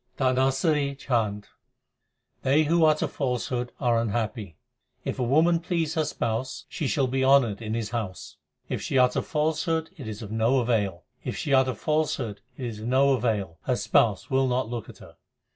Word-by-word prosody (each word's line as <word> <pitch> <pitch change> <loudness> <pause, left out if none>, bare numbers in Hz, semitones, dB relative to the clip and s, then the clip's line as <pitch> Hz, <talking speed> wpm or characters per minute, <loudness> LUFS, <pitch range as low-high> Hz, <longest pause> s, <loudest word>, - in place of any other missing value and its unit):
DHANASARI 135 +2 +2
CHHANT 110 -6 -1 1.0
They 140 +4 +3
who 165 +2 +3
utter 155 0 +3
falsehood 125 -2 -2
are 120 -4 +2
unhappy: 110 - -3 0.5
If - - -3
a - - +1
woman 160 +7 +3
please 165 -2 -1
her 160 -1 +1
Spouse, 130 -1 -3
she 150 - -3
shall 140 0 +1
be 130 +1 0
honoured 130 -6 +4
in 110 0 -3
His 115 -3 -3
house: 110 -6 -5 0.3
If - - -3
she 135 - -1
utter 125 0 +4
falsehood 160 +1 -1
it 135 - -8
is 110 +1 -6
of 105 - -8
no 115 +4 +2
avail: 110 -7 0 0.2
If - - -4
she 140 - -1
utter 130 -2 +3
falsehood 135 -5 -1 0.2
it 130 - -5
is 110 -3 -5
of 110 - -5
no 135 +2 +4
avail; 105 -9 -1
her - - +1
Spouse - - +2
will 135 0 +3
not 125 -1 0
look 120 -3 -5
at - - -12
her. - - -15
130 Hz, 175 wpm, -26 LUFS, 115-140 Hz, 1.0 s, honoured